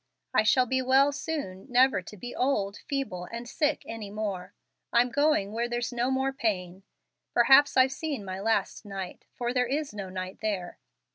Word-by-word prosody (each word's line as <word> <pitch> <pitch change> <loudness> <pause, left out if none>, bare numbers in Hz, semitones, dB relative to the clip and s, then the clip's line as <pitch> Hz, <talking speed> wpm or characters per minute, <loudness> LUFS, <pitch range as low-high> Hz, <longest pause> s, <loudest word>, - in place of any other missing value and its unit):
I - - +5
shall 250 +4 +4
be 260 +1 0
well 265 +2 +4
soon, 280 -10 -5
never 255 -4 +4
to 210 +4 -11
be 245 +5 -7
old, 205 -7 0
feeble, 265 -11 -3
and 235 +4 -7
sick 300 +3 0
any 225 -3 -6
more. 200 -3 -4 0.4
I'm 245 +1 +3
going 285 -8 +2
where 235 +2 -1
there's 240 +1 -2
'no 240 +1 0
more 265 +1 0
pain.' 190 -8 -2 0.5
Perhaps 270 +4 +6
I've 260 0 +6
seen 275 -6 -4
my 185 0 -5
last 225 +3 0
night, 195 -3 -7
for 240 0 -2
there 250 -1 +2
is 285 +1 -2
'no 200 -2 -6
night 185 0 -6
there.'" 200 -5 -3
240 Hz, 180 wpm, -28 LUFS, 200-265 Hz, 0.5 s, Perhaps